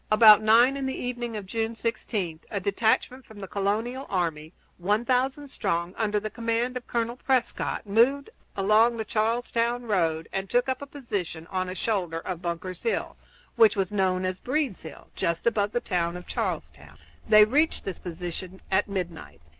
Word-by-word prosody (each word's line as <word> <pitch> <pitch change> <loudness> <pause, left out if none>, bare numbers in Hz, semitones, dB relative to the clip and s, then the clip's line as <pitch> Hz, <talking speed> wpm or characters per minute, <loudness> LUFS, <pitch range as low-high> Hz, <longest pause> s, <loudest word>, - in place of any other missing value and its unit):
About 215 -1 +8
nine 235 +5 +5
in 270 -1 -2
the 265 - -3
evening 240 -2 -3
of 205 - -6
June 225 +3 -2
16 210 -7 -3
a 200 - -2
detachment 220 +6 0
from 220 -3 -14
the 195 - -6
colonial 220 +8 -2
army, 165 -5 -2 0.3
one 205 +6 +1
thousand 265 +3 0
strong, 170 -6 -2
under 210 -2 0
the 215 +1 -5
command 230 +2 -1
of 250 - -6
Colonel 235 +1 -1
Prescott, 255 -4 -1
moved 250 - +2 0.3
along 215 +4 +4
the 220 - -3
Charlestown 235 +2 0
road 165 -7 0
and 195 0 -3
took 245 +1 +2
up 260 0 -2
a 280 - -6
position 200 - -5
on 185 -1 -1
a 185 - -5
shoulder 180 -6 -1
of 175 0 -5
Bunker's 180 +1 -4
Hill, 460 - -1 0.4
which 230 -2 +6
was 195 -2 -1
known 185 -2 +1
as 185 0 -2
Breed's 275 - -1
Hill, 160 - -11
just 170 0 -1
above 210 -3 +2
the 240 - 0
town 175 -5 -1
of 180 - -10
Charlestown. - - -4 0.3
They 215 -1 +8
reached 295 +8 +1
this 195 - -5
position 180 +2 -6
at 190 +2 +2
midnight. 170 - -5
215 Hz, 175 wpm, -26 LUFS, 185-240 Hz, 0.4 s, About